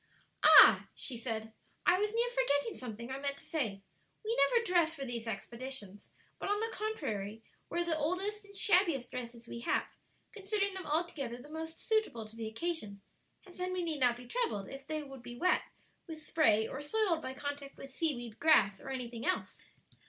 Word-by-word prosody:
"Ah," - - +9
she 260 - -2
said, 225 -2 -4 0.3
"I 360 +1 +5
was 420 +1 +1
near 470 +2 +1
forgetting 460 -7 +1
something 235 0 -6
I 265 - -3
meant 280 0 -1
to - - -11
say: 220 - -2 0.4
we 455 +2 0
never 475 -1 +4
dress 345 -4 +3
for 275 -3 -5
these 235 -2 -4
expeditions, 225 -1 -6 0.3
but, - - -3
on 410 0 +2
the 450 +1 -2
contrary, 225 - -3 0.3
wear 345 0 0
the 335 -2 +1
oldest 385 +7 -1
and 400 0 -14
shabbiest 345 - +3
dresses 235 -2 -6
we 235 - -6
have; 235 - +1 0.5
considering 400 -1 -1
them 380 -2 -6
altogether 295 -6 -1
the 285 +4 -12
most 320 +1 -6
suitable 435 - 0
to 215 +1 -11
the 225 -1 -4
occasion, 220 - -4 0.4
as 365 - -12
then 365 0 -2
we 365 -1 -1
need 320 -3 -2
not 245 -2 +3
be 245 - -11
troubled 240 - -2
if 270 +1 -9
they 310 -1 -2
should 270 -3 -10
be 240 0 -8
wet 365 +1 +3 0.5
with 320 -2 -6
spray 225 -9 +3
or 265 - -5
soiled 345 +1 +1
by 260 -2 -5
contact 285 0 -5
with 275 - -9
seaweed, 240 -7 -2
grass, 215 -11 +5
or - - -8
anything 245 -3 -4
else." 370 - -1
285 Hz, 190 wpm, -33 LUFS, 235-365 Hz, 0.5 s, Ah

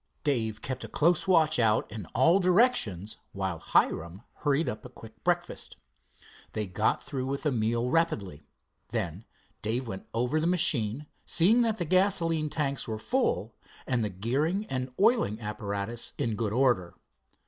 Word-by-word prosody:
Dave 115 -8 -1
kept 130 -1 -4
a - - -5
close 170 +4 +2
watch 160 -6 +4
out 110 -2 +2
in 105 -5 -7
all 165 +10 +5
directions 180 - +2 0.2
while 95 -4 -3
Hiram 85 +4 0
hurried 145 +2 +1
up 105 - -4
a 125 - -9
quick 110 -3 -14
breakfast. 175 0 -2 0.8
They 110 - -2
got 105 +4 0
through 130 -2 -4
with 140 +1 -3
the 150 - +1
meal 115 0 0
rapidly. 100 - -1 0.4
Then 100 -4 -3 0.4
Dave 120 +4 -2
went 95 -3 -7
over 125 +7 0
the 160 - 0
machine, 150 -8 +1 0.2
seeing 205 +9 +4
that 225 -2 +1
the 175 - -2
gasoline 165 -3 +2
tanks 140 -4 -2
were 110 -1 -3
full 115 - 0 0.3
and 125 -3 0
the 105 - -1
gearing 140 - -1
and 130 0 -2
oiling 205 - +3
apparatus 105 +1 -4
in 115 -6 -1
good 105 -1 -1
order. 120 -8 +1
125 Hz, 155 wpm, -28 LUFS, 105-165 Hz, 0.8 s, all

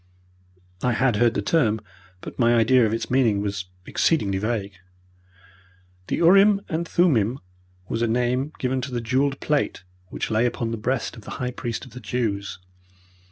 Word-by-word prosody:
I 125 - +1
had 125 -1 +2
heard 120 +1 +3
the 100 - -1
term, 110 -6 +2 0.4
but - - -9
my 120 0 +4
idea 115 +1 +4
of - - -2
its 115 +1 -3
meaning 120 -6 +3
was 100 -2 -3 0.2
exceedingly 100 -12 +1
vague. 105 -2 -2 1.3
"The - - 0
urim 195 +4 +5
and 165 +2 -2
thummim 130 - +2 0.5
was 115 - -2
a 120 - +2
name 125 +4 0
given 130 0 -1
to 130 +1 -5
the 120 - -2
jewelled 135 +4 0
plate 150 -9 -1 0.2
which - - -4
lay 110 +3 +3
upon 115 -1 -3
the 115 - -3
breast 125 +4 -2
of 115 - -11
the - - -10
high 125 0 -2
priest 120 0 -5
of 130 - -14
the 125 - -9
Jews. 105 -6 -2
120 Hz, 170 wpm, -24 LUFS, 110-130 Hz, 1.3 s, urim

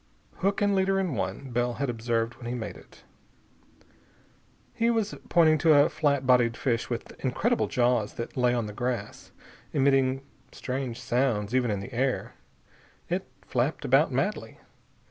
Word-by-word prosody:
"Hook 200 +2 0
and 205 0 +3
leader 195 0 +2
in 185 -6 -1
one," 135 0 -4
Bell 120 0 0
had 140 +3 -2
observed 115 0 -1
when 120 - -8
he 120 - -2
made 110 -3 -5
it. - - -17 1.7
He 230 +1 +1
was 225 -3 0 0.2
pointing 160 -2 +5
to 155 0 +5
a 145 0 +6
flat 140 -3 0
bodied 120 -2 +4
fish 120 -4 -1
with 120 - -4
incredible 210 - +1
jaws 120 -4 +1
that 115 - -6
lay 125 -1 +2
on 120 -2 -1
the 105 - -7
grass, 120 -2 -4 0.4
emitting 135 -1 +2 0.3
strange 130 -2 -4
sounds 120 -4 0
even 125 -2 +2
in 100 -2 -1
the 120 +6 -9
air. 130 +2 -1 0.8
It - - -2 0.2
flapped - - -1
about - - +4
madly. - - -2
125 Hz, 155 wpm, -27 LUFS, 120-145 Hz, 1.7 s, a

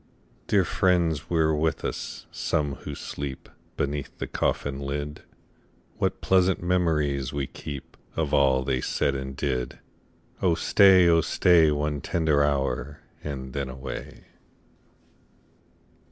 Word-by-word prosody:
Dear 100 -3 +3
friends 85 -6 +1
were 80 -2 +2
with 80 +1 0
us, - - -5
some 75 -2 -1
who - - -7
sleep 70 -2 -6 0.3
Beneath 70 -1 -3
the - - -3
coffin 70 -1 -1
lid: 70 +2 -4 0.8
What - - 0
pleasant 95 -1 +3
memories 75 -7 0
we 70 -1 -2
keep 70 +1 -8 0.2
Of 80 -3 -1
all 65 -2 +4
they 65 -2 0
said 70 - 0
and 65 0 -5
did! 65 -4 -2 0.6
Oh 90 -3 +3
stay, 95 +1 +6
oh 85 -1 +5
stay, 85 -1 +4
One 75 -1 -1
tender 80 -3 +2
hour, 70 -1 -1 0.2
and 65 -3 -5
then 70 -2 -3
away. 65 +1 -7
75 Hz, 125 wpm, -26 LUFS, 70-80 Hz, 0.8 s, stay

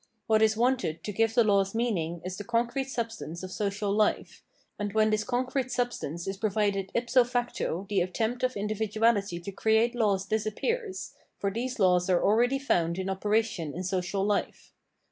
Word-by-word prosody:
What 220 -1 +3
is 220 0 +3
wanted 240 -9 0
to 210 - -3
give 225 +3 +1
the 240 - +6
laws 200 -1 +2
meaning 175 -8 -1
is 185 0 -4
the 205 - -6
concrete 240 +4 -1
substance 225 - -4
of 185 - -6
social 200 +1 -2
life: 210 +1 0 0.4
and 205 -1 -3
when 215 0 +3
this 215 0 +1
concrete 255 +2 -1
substance 240 - -2
is 195 0 -3
provided 200 -2 0
ipso 245 +1 +4
facto 240 -7 -2
the 195 -2 +1
attempt 220 +7 -1
of 255 -3 0
individuality 210 -2 0
to 175 +3 -7
create 220 +4 +2
laws 205 -5 +1
disappears, 375 - -2 0.2
for 200 - -1
these 245 +5 -3
laws 180 -3 +3
are 180 -2 +3
already 240 +6 +3
found 170 -11 0
in 190 0 -2
operation 205 -5 -1
in 180 - -4
social 185 +1 -1
life. 205 -1 -2
215 Hz, 170 wpm, -28 LUFS, 195-235 Hz, 0.4 s, the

